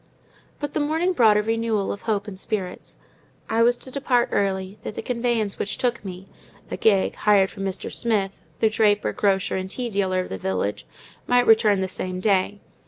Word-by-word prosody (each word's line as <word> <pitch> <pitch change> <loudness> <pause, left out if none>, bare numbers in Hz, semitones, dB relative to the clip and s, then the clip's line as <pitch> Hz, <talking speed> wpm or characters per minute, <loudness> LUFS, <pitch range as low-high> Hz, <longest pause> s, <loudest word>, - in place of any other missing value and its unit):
But 290 -1 -4
the - - 0
morning 320 +5 +1
brought 220 -9 +5
a 210 - +2
renewal 225 -2 0
of 200 - -6
hope 210 -2 -1
and 190 -2 -7
spirits. 195 -4 -4 0.5
I 225 - +1
was 240 +1 +4
to 260 - -9
depart 250 -3 +1
early; 190 0 -1
that 215 - -6
the - - -5
conveyance 235 -4 -1
which 200 - -2
took 240 -3 -1
me 190 -1 -8 0.4
(a - - -1
gig, 200 -4 +3
hired 200 -2 +3
from 195 -2 -5
Mr. 190 0 -4
Smith, 210 -5 0 0.3
the 220 - +5
draper, 210 -2 +2
grocer, 195 -2 +1
and 190 0 -4
tea 240 +3 -3
dealer 190 -2 +1
of - - -7
the 95 - -5
village) 95 +3 -2 0.4
might 245 0 +4
return 215 -3 +5
the 190 - 0
same 185 0 -4
day. 200 0 +1
210 Hz, 190 wpm, -24 LUFS, 190-230 Hz, 0.5 s, brought